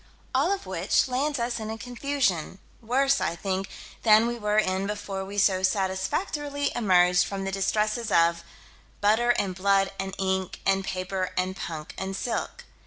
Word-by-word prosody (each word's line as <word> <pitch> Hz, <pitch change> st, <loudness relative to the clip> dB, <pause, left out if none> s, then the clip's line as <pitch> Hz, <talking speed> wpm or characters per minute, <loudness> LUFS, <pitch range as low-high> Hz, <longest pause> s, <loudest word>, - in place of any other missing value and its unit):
All -, -, +2 dB
of 395 Hz, 0 st, -2 dB
which -, -, +1 dB
lands 280 Hz, +4 st, 0 dB
us 235 Hz, 0 st, -2 dB
in 220 Hz, 0 st, -5 dB
a 220 Hz, -, -4 dB
confusion, 245 Hz, -, -1 dB, 0.2 s
worse, 270 Hz, +4 st, +2 dB
I -, -, 0 dB
think, 190 Hz, +1 st, -3 dB, 0.3 s
than 220 Hz, 0 st, +6 dB
we 240 Hz, 0 st, -2 dB
were 210 Hz, 0 st, 0 dB
in 190 Hz, -2 st, +1 dB
before 200 Hz, -2 st, -4 dB
we 200 Hz, +1 st, -8 dB
so 190 Hz, -2 st, +3 dB
satisfactorily 280 Hz, -, -1 dB
emerged 180 Hz, -5 st, +4 dB
from 195 Hz, +1 st, -4 dB
the 195 Hz, -, -2 dB
distresses 215 Hz, +3 st, 0 dB
of 170 Hz, 0 st, +3 dB, 0.6 s
butter 220 Hz, +4 st, +3 dB
and 195 Hz, -2 st, -1 dB
blood 195 Hz, +1 st, +2 dB
and 195 Hz, 0 st, -4 dB
ink 190 Hz, -1 st, -1 dB
and 195 Hz, 0 st, +2 dB
paper 185 Hz, 0 st, -3 dB
and 185 Hz, +1 st, 0 dB
punk 160 Hz, -4 st, -6 dB
and 190 Hz, 0 st, -3 dB
silk. 230 Hz, +4 st, -3 dB
195 Hz, 165 wpm, -26 LUFS, 190-235 Hz, 0.6 s, than